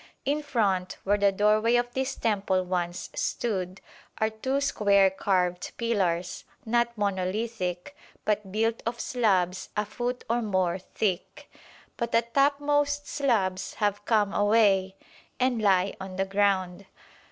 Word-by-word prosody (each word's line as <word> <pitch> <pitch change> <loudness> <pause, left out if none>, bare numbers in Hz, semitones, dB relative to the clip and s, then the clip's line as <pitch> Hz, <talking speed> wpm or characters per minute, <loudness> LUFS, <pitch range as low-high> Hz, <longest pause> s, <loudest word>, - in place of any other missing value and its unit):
In 290 +2 0
front, 200 -10 0
where 205 +1 +2
the 200 0 +4
doorway 215 +4 +3
of 245 0 0
this 265 +1 -2
temple 195 -4 0
once 175 -1 -3
stood, 190 -5 -2 0.4
are 220 0 +1
two 260 +5 -1
square 200 -8 +3
carved 180 -2 -1
pillars, 185 -7 -1 0.2
not 235 +1 +1
monolithic, 200 +2 -2 0.3
but 210 -2 -1
built 225 +2 0
of 235 0 -3
slabs 190 -8 0
a 210 - +1
foot 245 +4 -4
or 235 +1 +1
more 185 -4 0
thick; 190 0 -3 0.5
but 235 -1 -2
the 230 - +4
topmost 290 +3 +1
slabs 195 -9 0
have 205 -1 -1
come 210 -3 +2
away 205 -3 +3 0.4
and 250 -3 +1
lie 195 -2 +2
on 190 -1 -7
the 195 +1 0
ground. 195 -1 0
205 Hz, 130 wpm, -27 LUFS, 190-235 Hz, 0.5 s, the